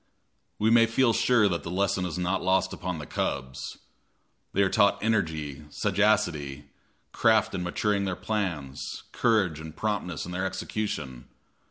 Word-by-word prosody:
We 110 +2 +2
may 115 0 +6
feel 115 +1 +3
sure 120 -4 +4
that 85 -3 -1
the - - -7
lesson 95 0 0
is 85 - -5
not 90 +1 0
lost 95 +1 +2
upon 90 -2 -4
the 75 - -6
cubs. 65 -1 -3 0.7
They 100 - +3
are - - +3
taught 100 0 +4
energy, 80 -9 -1
sagacity, 75 -9 0 0.4
craft 110 -2 +3
in 90 - -2
maturing 100 +3 0
their 95 -1 -1
plans, 85 -12 -3
courage 100 -10 +2
and 80 0 -9
promptness 100 -6 -2
in 90 - -7
their 95 +2 -1
execution. 80 - -4
95 Hz, 150 wpm, -27 LUFS, 80-105 Hz, 0.7 s, may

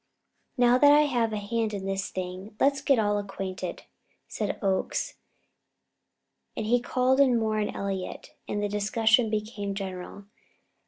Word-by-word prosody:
"Now 245 0 +5
that 290 +1 +7
I 295 +1 +7
have 245 -6 +1
a 215 - -2
hand 215 +1 -2
in 195 -1 -5
this 195 0 -2
thing, 185 +3 -6
let's 275 0 +3
all - - -14
get 275 -3 +4 0.3
acquainted," 190 -2 -5 0.4
said - - -3
Oakes; 195 -2 -1 1.4
and - - -2
he 245 +3 +3
called 255 +2 +1
in 260 -4 +5
Moore 220 -1 0
and 210 - -2
Elliott, 195 -2 -4 0.2
and 205 0 -2
the - - +1
discussion 220 +3 +2
became 210 -2 -3
general. 190 0 -6
215 Hz, 150 wpm, -27 LUFS, 195-240 Hz, 1.4 s, that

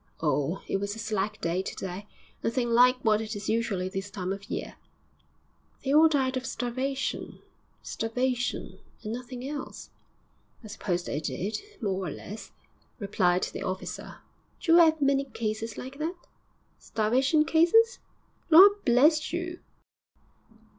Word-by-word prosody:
'Oh, 150 +2 0
it - - 0
was 200 +1 -3
a - - -10
slack 215 -1 -2
day 170 +2 0
to 190 - -6
day. 190 +2 -6 0.4
Nothing 240 0 0
like 250 +2 +6
what 215 -1 +4
it 220 0 -5
is 205 0 -6
usually 220 -5 0
this 195 +1 -5
time 190 -1 -3
of 200 0 -10
year.' - - -4 1.1
'They 275 - 0
all 315 +2 +7
died 265 -3 +1
of 255 - -2
starvation 260 +3 -3 0.5
starvation, 245 +2 -2 0.2
and 215 0 -4
nothing 250 +1 -6
else.' 290 0 -7 0.7
'I - - -9
suppose 180 -4 -2
they 145 - -3
did, 190 - -3 0.2
more 190 -2 -1
or - - -2
less,' 210 +8 -8 0.5
replied 185 -4 +1
the - - -4
officer. 185 0 -5 0.4
'D'you 335 0 +5
'ave 315 -3 +5
many 275 0 +2
cases 225 -3 -4
like 265 +3 -8
that?' 345 +3 -4 0.5
'Starvation 260 +8 +2
cases? 400 +10 +4 0.5
Lor' 390 +5 +9
bless 300 +5 +4
you! 345 +1 -4
235 Hz, 140 wpm, -28 LUFS, 200-280 Hz, 1.1 s, Lor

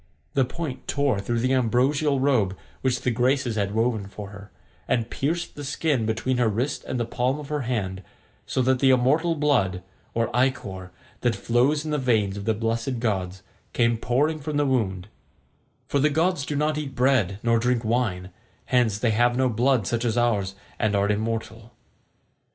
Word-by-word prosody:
The 135 -2 +3
point 135 -1 -6
tore 140 -7 +1
through 115 +4 -1
the 130 +2 +1
ambrosial 135 +4 +2
robe 110 -9 +2 0.2
which 130 -2 0
the 125 - +1
Graces 125 0 +1
had 100 -1 -1
woven 110 -3 0
for 100 0 -8
her, 100 0 -11 0.4
and 115 -2 0
pierced 170 +5 -2
the 145 - -8
skin 135 -4 0
between 115 +3 0
her 120 -2 +3
wrist 115 +7 -1
and 125 - -3
the 120 - 0
palm 125 +4 -1
of 150 -1 -9
her 150 -1 -1
hand, 95 -6 -2 0.5
so 130 - 0
that 130 0 +2
the 135 - +4
immortal 145 +7 +3
blood, 120 - +1 0.3
or 115 0 0
ichor, 110 -8 -1 0.3
that 120 -2 +1
flows 135 +6 +1
in 155 - -3
the 150 - 0
veins 110 -6 +1
of 100 -1 -6
the 110 - +1
blessed 115 +3 -2
gods, 95 -5 -2 0.3
came 115 0 +3
pouring 145 +7 0
from 150 0 -3
the 145 - +2
wound; 100 -8 0 0.8
for 140 - +1
the 150 +3 +4
gods 160 0 +1
do 150 - -2
not 150 +1 +1
eat 145 -3 -6
bread 125 -7 +2
nor 115 -1 +3
drink 120 0 0
wine, 105 -6 -1 0.3
hence 120 -5 +2
they 115 +1 +1
have 120 +3 +2
no 130 -1 +3
blood 120 -1 +2
such 120 +4 -1
as 120 -1 0
ours, 105 -5 +1 0.2
and 105 -1 +1
are 100 +1 +2
immortal. 110 +1 -3
120 Hz, 185 wpm, -25 LUFS, 110-135 Hz, 0.8 s, the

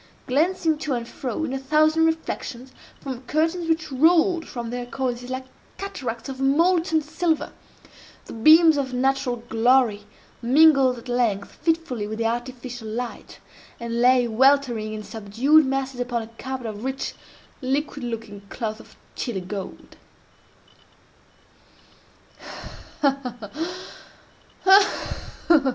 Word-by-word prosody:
Glancing 315 +3 +1
to 300 -3 -2
and 235 -1 -3
fro, 255 +4 -4
in 290 - -2
a 270 - -2
thousand 310 +4 +3
reflections, 265 -5 -4 0.3
from 260 -3 -6
curtains 330 +2 0
which 320 -2 0
rolled 330 +5 +3
from 235 -2 -6
their 245 0 -4
cornices 245 -1 -3
like 260 0 -4 0.3
cataracts 260 -12 -5
of 265 -1 -6
molten 325 +4 +2
silver, 320 +1 -1 0.7
the - - -9
beams 315 +6 +6
of 265 -2 -2
natural 265 0 +1
glory 230 -2 +2 0.4
mingled 270 0 +5
at 235 - -11
length 235 -5 0
fitfully 320 -10 -1
with 220 +1 -5
the 230 - -1
artificial 240 0 -4
light, 235 +2 -6 0.4
and 235 0 -2
lay 250 0 +5
weltering 240 -2 +2
in 215 0 -6
subdued 230 +8 +2
masses 270 -1 -2
upon 245 -2 -2
a - - -10
carpet 260 -1 -5
of 215 0 -6
rich, 265 +1 -3 0.5
liquid 275 +1 -2
looking 225 -4 -6
cloth 220 -2 -4
of - - -16 0.2
Chili 235 -7 -3
gold. 190 +1 -8
255 Hz, 115 wpm, -24 LUFS, 235-305 Hz, 0.7 s, beams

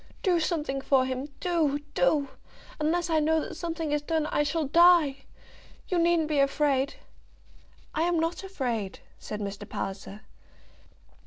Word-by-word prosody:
"Do 360 -3 +3
something 300 -5 -1
for 270 -1 +3
him; 260 +2 -3
do, 325 -5 +1 0.2
do. 280 +1 +2 0.5
Unless 335 +3 0
I 320 - +4
know 320 +1 +2
that - - -5
something 325 -2 -4
is 295 0 +1
done, 315 0 -1
I - - +2
shall 310 +2 0
die. 315 -3 +5 0.6
You 360 - +1
needn't 335 -2 +3
be 300 -2 +1
afraid." 275 -1 +1 1.0
"I'm 335 +1 +1
not 330 +4 -2
afraid," 245 - -3 0.2
said 210 - -6
Mr. 200 -1 -6
Palliser. 195 +1 -5
300 Hz, 140 wpm, -27 LUFS, 270-335 Hz, 1.0 s, die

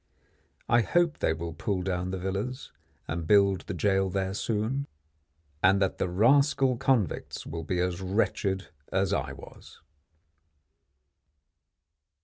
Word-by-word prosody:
I 120 - +4
hope 170 +6 +1
they - - +2
will 85 +1 -4
pull 95 0 -2
down 90 -1 -2
the 95 - -3
villas 100 +8 -4 0.4
and 80 -1 -3
build 100 -2 +4
the 105 - -3
jail 95 +1 +2
there 95 0 -2
soon, 115 +7 -1 0.7
and 95 +2 +5
that 95 -2 0
the 90 - 0
rascal 130 +6 +3
convicts 120 - 0
will 80 +1 -5
be 90 +3 -2
as 90 0 -1
wretched 95 0 -1 0.2
as 95 +1 +1
I 70 -8 -1
was. 70 - -14
95 Hz, 125 wpm, -28 LUFS, 90-110 Hz, 0.7 s, and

